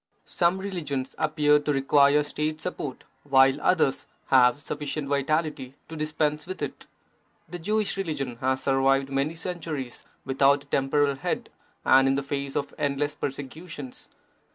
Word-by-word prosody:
Some 175 +1 +1
religions 155 -9 -4
appear 150 -1 +3
to 150 0 -1
require 140 +1 +4
State 155 +1 -3
support, 150 -6 -5 0.2
while 135 0 +4
others 160 -7 +2 0.2
have 125 0 +5
sufficient 145 0 -4
vitality 140 -1 -1
to 160 - -7
dispense 150 0 -1
with 185 - -5
it. - - -6 0.6
The 175 +2 -7
Jewish 210 +3 0
religion 145 -10 -3
has 130 +1 -1
survived 135 0 +2
for - - -7
many 140 +4 0
centuries 160 -7 -5 0.2
without 140 +1 +3
a - - -24
temporal 140 0 +1
head - - -3 0.3
and 135 0 +6
in 135 - +3
the 140 - -1
face 140 0 -4
of 140 -1 -2
endless 145 +1 0
persecu 145 +4 -6
tions. 140 -5 -8
145 Hz, 150 wpm, -26 LUFS, 135-155 Hz, 0.6 s, and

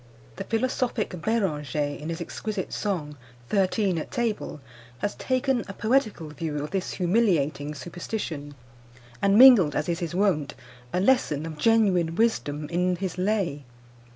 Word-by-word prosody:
The 195 - -5
philosophic 240 0 -1
Beranger, 160 - -1 0.2
in 150 +2 -6
his 165 +1 -4
exquisite 200 +3 -4
song, 160 -8 -3 0.3
Thirteen 195 -2 +1
at - - -6
Table, 230 -9 -2 0.4
has 205 +9 -2
taken 255 -2 0
a 195 - -6
poetical 215 - 0
view 150 -1 -4
of 150 - -6
this 190 -1 -2
humiliating 170 -7 +1
superstition, 155 - -5 0.7
and 200 +1 +4
mingled, 230 - +8
as - - -1
is 170 0 -1
his 175 -1 -4
wont, 175 -8 +1 0.4
a 180 - 0
lesson 185 - +2
of 155 -2 -7
genuine 190 -6 +3
wisdom 155 -9 0
in 180 +1 +1
his 185 0 -4
lay. 185 -7 0
185 Hz, 140 wpm, -26 LUFS, 155-220 Hz, 0.7 s, mingled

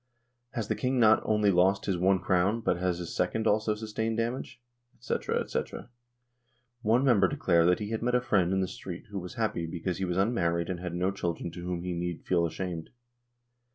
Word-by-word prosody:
Has 115 -3 -2
the - - +1
King 130 0 0
not 110 -1 +6
only 105 -2 +3
lost 95 +2 +3
his 95 - 0
one 95 +2 +3
crown, 95 +5 +1
but 90 - +1
has 90 -1 0
his 85 -2 -6
second 110 - 0
also 110 0 +2
sustained 110 +1 -3
damage? 120 +1 -3 0.4
&c., - - -2 0.3
&c." - - -1 1.2
One 120 +3 +3
member 105 -8 +5
de - - -4
clared 85 -2 +3
that 90 - +4
he 105 0 -5
had 110 - -2
met 125 +1 +1
a - - +5
friend 95 -7 +2
in 95 0 +2
the 95 - 0
street 90 -1 -8
who 100 - -3
was 90 +5 -8
happy 110 -8 -1
because 85 +1 -3
he 95 - 0
was 90 0 -2
unmarried 85 -5 +1
and 90 - -4
had 90 -1 -5
no 90 +2 +1
children 85 -3 -3
to 85 +1 -8
whom 90 -1 -3
he 90 0 -2
need 85 -1 -4
feel 85 -2 +2
ashamed. 85 -1 -5
95 Hz, 210 wpm, -29 LUFS, 90-110 Hz, 1.2 s, not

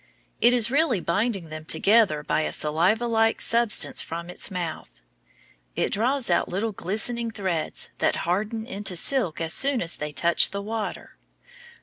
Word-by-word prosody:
It 240 - +6
is 240 -2 +3
really 280 - +2
binding 195 0 -1
them 155 0 -7
together 195 -3 +3
by 155 - 0
a - - -2
saliva 175 +10 +1
like 225 -1 +2
substance 235 -1 +1
from 170 +1 -6
its - - -2
mouth. 165 - -6 0.8
It - - 0
draws 250 +4 +1
out - - +2
little 205 +5 -2
glistening 220 +5 -1
threads 190 -7 -1
that - - +2
harden 215 +6 -1
into 200 -6 -4
silk 180 - 0
as 165 -1 -1
soon 275 -2 +3
as 170 -4 -2
they 150 0 -4
touch 170 +5 +2
the 200 +1 -4
water. 220 0 -5
200 Hz, 155 wpm, -25 LUFS, 170-230 Hz, 0.8 s, It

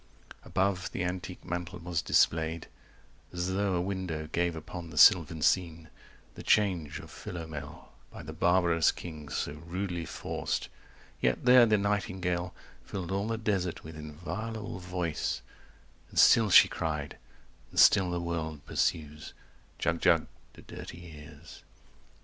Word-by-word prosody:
Above 95 -1 -1
the 90 - -2
antique 90 +1 -5
mantel 90 +1 -4
was 85 -1 -2
displayed 80 0 +2 0.7
As 90 +1 -2
though 100 -1 0
a 85 - +1
window 90 -4 -3
gave 85 0 0
upon 85 +2 -8
the 75 - -10
sylvan 80 -4 +6
scene 85 -1 +1 0.4
The - - -10
change 90 -8 +1
of - - -11
Philomel, 80 -4 -8 0.2
by - - -10
the 80 - -8
barbarous 85 0 +3
king 75 -4 -9
So - - -2
rudely 85 +2 -4
forced; - - -4 0.5
yet - - 0
there 125 -1 +8
the 110 -1 +4
nightingale 95 -3 -1
100 - - -22 0.2
Filled 95 -2 -6
all 100 +2 -1
the 115 0 -1
desert 100 -6 -2
with 80 0 -9
inviolable 90 +7 -6
voice 90 -3 -3 0.7
And - - -12
still 115 -3 +6
she - - +9
cried, 75 -3 -4 0.5
and - - -2
still 95 -3 +6
the 90 0 -2
world 80 -3 -4
pursues, 75 -1 -2 0.4
"Jug - - -1
Jug" - - +4 0.3
to - - -14
dirty 85 -1 -10
ears. 75 +1 -13
85 Hz, 140 wpm, -30 LUFS, 80-95 Hz, 0.7 s, she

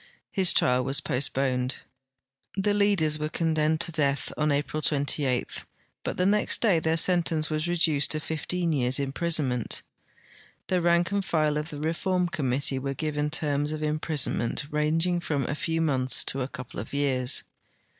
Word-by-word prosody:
His 190 -3 +3
trial 125 0 +3
was 135 +3 0
postponed. 130 -2 -1 0.8
The 200 +1 +1
leaders 195 -7 +2
were 150 0 -2
condemned 160 -1 +1
to 170 - 0
death 145 -3 0
on 150 0 +1
April 145 +2 -1
28, 140 -3 0 0.6
hut - - -3
the 180 - +2
next 210 +2 +2
day 200 -8 +3
their 160 +1 0
sentence 165 -3 +3
Avas 155 +1 -1
reduced 160 -4 +2
to 155 - +1
fifteen 165 +2 -2
years' 130 -2 +3
imprisonment. 140 -3 0 0.9
The 185 -1 +2
rank 170 +1 +2
and 200 -1 0
file 155 -4 +1
of 150 +2 -3
the 150 - -7
reform 175 +3 0
committee 135 -4 0
were 135 +1 -3
given 150 +1 -1
terms 150 -2 0
of 155 0 -4
imprisonment 150 -4 -1
ranging 165 +4 +1
from 145 -6 -2
a - - -2
few 165 +2 -1
months 130 -5 +2
to 135 - -2
a 130 - -1
couple 130 -2 -8
of 110 +7 -6
years. 130 -3 0
155 Hz, 160 wpm, -27 LUFS, 140-170 Hz, 0.9 s, His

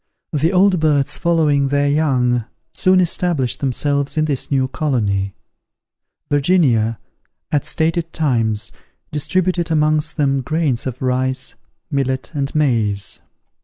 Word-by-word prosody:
The 155 +3 +2
old 190 -1 +4
birds 150 -3 +1
following 155 -5 +2
their 145 +1 +1
young, 130 -6 +1 0.3
soon 185 0 +3
established 170 -7 0
themselves 140 +2 -1
in 155 - +3
this 145 -4 -2
new 135 -2 +1
colony. 105 -10 -1 0.9
Virginia, 140 -8 +2 0.5
at 145 -3 +1
stated 165 +1 -1
times, 115 -8 0 0.4
distributed 175 +3 0
amongst 155 -1 +1
them 140 -2 +1
grains 145 -3 -1
of 130 0 -5
rice, 130 +1 -1 0.4
millet, 130 -2 -1
and 140 -1 -3
maize. 115 -9 0
145 Hz, 115 wpm, -19 LUFS, 130-155 Hz, 0.9 s, old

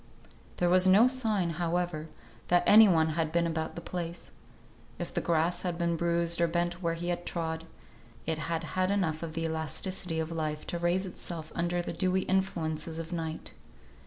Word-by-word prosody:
There 175 - +2
was 185 +1 +5
no 200 +5 +7
sign, 220 -9 +1
however, 170 -2 -1 0.4
that 175 0 +4
any 215 +1 +9
one 160 -4 +3
had 160 0 -1
been 170 +1 +2
about 160 -1 -2
the 170 - -6
place. 170 0 -6 0.7
If - - -5
the - - 0
grass 170 +1 +1
had 175 -2 -2
been 170 -1 +1
bruised 170 0 +1
or 170 - +4
bent 175 +1 -1
where 165 -1 0
he 175 +1 -4
had 175 0 -2
trod, 165 -2 -3 0.6
it 160 0 -1
had 165 +1 -2
had 185 0 +1
enough 185 -6 0
of 165 -2 -5
the 165 - -1
elasticity 160 +2 -2
of 160 +1 -2
life 155 -2 -3
to 170 - -3
raise 175 +3 +1
itself 170 -3 -7
under 175 +1 0
the - - -4
dewy 185 0 +1
influences 165 -4 -1
of 165 +1 -5
night. 160 -2 -4
170 Hz, 185 wpm, -30 LUFS, 160-180 Hz, 0.7 s, any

